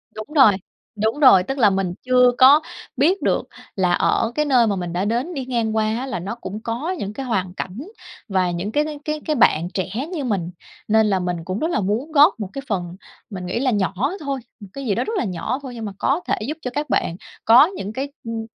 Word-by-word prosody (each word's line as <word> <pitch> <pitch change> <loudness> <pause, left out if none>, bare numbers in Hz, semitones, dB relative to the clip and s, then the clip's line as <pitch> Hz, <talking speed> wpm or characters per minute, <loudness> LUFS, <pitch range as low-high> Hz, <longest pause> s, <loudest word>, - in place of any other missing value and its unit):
Đúng 215 - -6
rồi. 265 -7 +8 0.4
Đúng 220 +6 -1
rồi. 255 -11 +7
Tức 270 +7 -4
là 220 -6 +5
mình 190 -2 -1
chưa 250 0 +4
có 275 +4 +7 0.4
biết 345 +9 +2
được - - 0 0.3
là 180 -2 +2
ở 225 +5 +1
cái 300 - +1
nơi 250 -5 +4
mà 205 - 0
mình 175 -2 -4
đã 180 +3 -1
đến 240 +11 -1
đi 270 -5 -4
ngang 230 -3 -1
qua 220 -1 +2
á, 260 - -4
là 255 -7 -4
nó 195 +6 -5
cũng 210 -2 -7
có 240 +10 -3
những 205 +1 -5
cái 270 +4 -5
hoàn 190 -7 -1
cảnh 190 +5 -6 0.5
và 185 -4 +1
những 175 +4 -3
cái 295 +5 +2
cái 300 -2 -6
cái 305 0 -2
cái 305 - 0
bạn 170 - +3
trẻ 190 -1 -2 0.2
như 300 -5 -3
mình. 190 -8 -2 0.4
Nên 220 0 +4
là 195 -2 +1
mình 180 -1 -2
cũng 185 +3 -3
rất 320 - 0
là - - +1
muốn 220 +10 -2
góp 300 -1 +5
một 200 -3 -4
cái 275 - -5
phần, 180 -6 -3 0.3
mình 185 -3 -6
nghĩ 185 +6 -2
là 260 -1 +1
nhỏ 200 -3 0 0.3
thôi, 280 -4 -3 0.2
một 205 - -10
cái 275 -1 -6
gì 205 - 0
đó - - 0
rất 445 - -4
là - - +1
nhỏ 205 +8 -3
thôi 255 -3 -8
nhưng 225 -2 -6
mà 205 - -4
có 285 +6 +1
thể - - +2
giúp 305 - -4
cho 250 - -4
các 295 0 -3
bạn 165 - 0 0.3
có 240 +5 +8
những 310 - -6
cái, 275 +4 -4
ưm, 230 -1 -4
225 Hz, 250 wpm, -21 LUFS, 195-275 Hz, 0.5 s, rồi